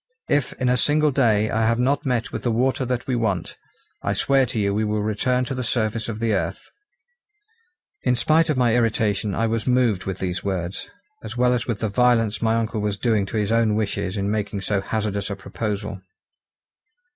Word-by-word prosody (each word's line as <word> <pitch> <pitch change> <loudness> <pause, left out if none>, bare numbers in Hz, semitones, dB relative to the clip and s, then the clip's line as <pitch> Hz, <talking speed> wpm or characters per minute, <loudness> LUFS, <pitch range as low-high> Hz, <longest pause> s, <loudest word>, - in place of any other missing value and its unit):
If 145 -3 +1
in 130 - -2
a 125 0 +3
single 150 +3 +3
day 110 -5 +2
I 110 +1 +1
have 115 0 +2
not 140 +4 +1
met 125 -3 0
with - - -4
the 120 - -1
water 130 +3 +1
that 125 -1 -2
we 130 - -1
want, 105 -7 -1 0.5
I - - 0
swear 135 -2 +2
to 115 - -4
you 100 -2 +1
we 105 +2 0
will 105 0 -1
return 125 +4 0
to 130 - -4
the 130 -1 -3
surface 115 -1 -1
of 110 -1 -4
the 115 -1 +1
earth." 95 - -3 1.3
In 125 - +2
spite 160 +6 +3
of 150 - +1
my 120 -3 +3
irritation 110 -4 +1
I 115 - +1
was 115 +1 -1
moved 120 -7 +2
with 95 -1 -3
these 95 -1 -3
words, 95 -2 -3 0.3
as 110 +2 -7
well 125 0 +3
as 125 - -2
with 115 -4 -2
the 110 - +1
violence 115 -1 +2
my 115 0 +2
uncle 115 -1 -1
was 105 -1 -1
doing 110 -3 +1
to 110 - -3
his 105 0 0
own 115 -2 +3
wishes 100 -2 -2
in 100 +1 -1
making 105 -2 -2
so 100 0 0
hazardous 100 -1 -2
a 100 - -3
proposal. 100 0 -4
110 Hz, 205 wpm, -23 LUFS, 105-125 Hz, 1.3 s, a